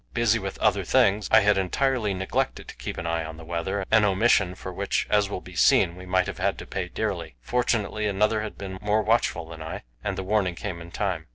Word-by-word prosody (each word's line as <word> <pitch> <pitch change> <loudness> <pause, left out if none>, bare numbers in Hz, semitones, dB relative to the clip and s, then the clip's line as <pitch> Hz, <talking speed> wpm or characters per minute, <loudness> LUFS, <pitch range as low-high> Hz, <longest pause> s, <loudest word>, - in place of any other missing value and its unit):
Busy - - +3
with - - -5
other - - +2
things, 105 +2 +3
I 110 - +7
had 105 -1 +3
entirely 110 +1 0
neglected 95 0 -2
to - - -9
keep - - -6
an 85 - -4
eye 85 0 -1
on 80 0 -8
the 80 - -10
weather, 90 +4 -2
an 110 -1 +6
omission 100 -2 +3
for 95 -1 -7
which, 100 +2 -1
as 105 -1 +3
will 95 - -4
be 90 - -12
seen, 85 +1 +4
we 90 0 -10
might 95 0 +2
have - - -6
had - - 0
to - - -8
pay - - -3
dearly. - - -3
Fortunately, 110 - 0
another 105 +2 +1
had 105 -1 -6
been 95 -1 -7
more 105 +1 +1
watchful 110 -7 +1
than 80 -1 -10
I, 80 - -6 0.2
and - - -2
the 95 - -3
warning 95 -2 +1
came 90 -3 -5
in 85 - -10
time. 90 -4 -2
95 Hz, 235 wpm, -25 LUFS, 90-105 Hz, 0.2 s, I